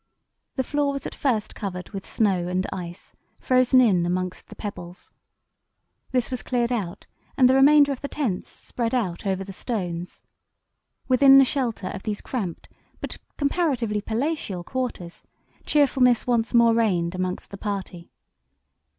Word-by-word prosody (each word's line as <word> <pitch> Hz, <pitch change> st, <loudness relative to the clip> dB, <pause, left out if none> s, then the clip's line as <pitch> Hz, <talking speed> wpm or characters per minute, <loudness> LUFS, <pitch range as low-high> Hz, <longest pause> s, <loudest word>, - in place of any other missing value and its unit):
The 260 Hz, -, 0 dB
floor 290 Hz, +1 st, 0 dB
was 275 Hz, -, -5 dB
at -, -, -5 dB
first 235 Hz, -7 st, -1 dB
covered 180 Hz, -4 st, -6 dB
with 195 Hz, -2 st, -7 dB
snow 190 Hz, -5 st, +1 dB
and 185 Hz, +1 st, -1 dB
ice, 175 Hz, +1 st, -8 dB, 0.3 s
frozen 255 Hz, 0 st, +4 dB
in 200 Hz, -9 st, +4 dB
amongst 180 Hz, +1 st, -3 dB
the -, -, -12 dB
pebbles. 180 Hz, -4 st, -8 dB, 1.0 s
This 250 Hz, 0 st, 0 dB
was 255 Hz, -, -2 dB
cleared 240 Hz, -1 st, -1 dB
out, 200 Hz, -8 st, -3 dB, 0.3 s
and 255 Hz, -3 st, +6 dB
the 255 Hz, -, +4 dB
remainder 285 Hz, +2 st, +6 dB
of 270 Hz, -, -4 dB
the 280 Hz, -, -3 dB
tents 250 Hz, -12 st, -3 dB
spread 235 Hz, 0 st, -4 dB
out 195 Hz, -6 st, -2 dB
over 190 Hz, 0 st, -1 dB
the 195 Hz, 0 st, -9 dB
stones. 180 Hz, -6 st, -4 dB, 0.8 s
Within 270 Hz, +1 st, +7 dB
the 270 Hz, -, +8 dB
shelter 235 Hz, -8 st, -2 dB
of 200 Hz, -, -6 dB
these 210 Hz, -1 st, -3 dB
cramped 200 Hz, -10 st, -4 dB, 0.3 s
but -, -, -6 dB, 0.2 s
comparatively 275 Hz, -9 st, 0 dB
palatial 225 Hz, -, -2 dB
quarters 240 Hz, -7 st, -5 dB, 0.5 s
cheerfulness 260 Hz, -5 st, +3 dB
once 235 Hz, -2 st, +1 dB
more 235 Hz, -1 st, +5 dB
reigned 185 Hz, -7 st, +1 dB
amongst 185 Hz, +1 st, -4 dB
the 200 Hz, -, -7 dB
party. 195 Hz, -4 st, -5 dB
225 Hz, 150 wpm, -24 LUFS, 185-260 Hz, 1.0 s, the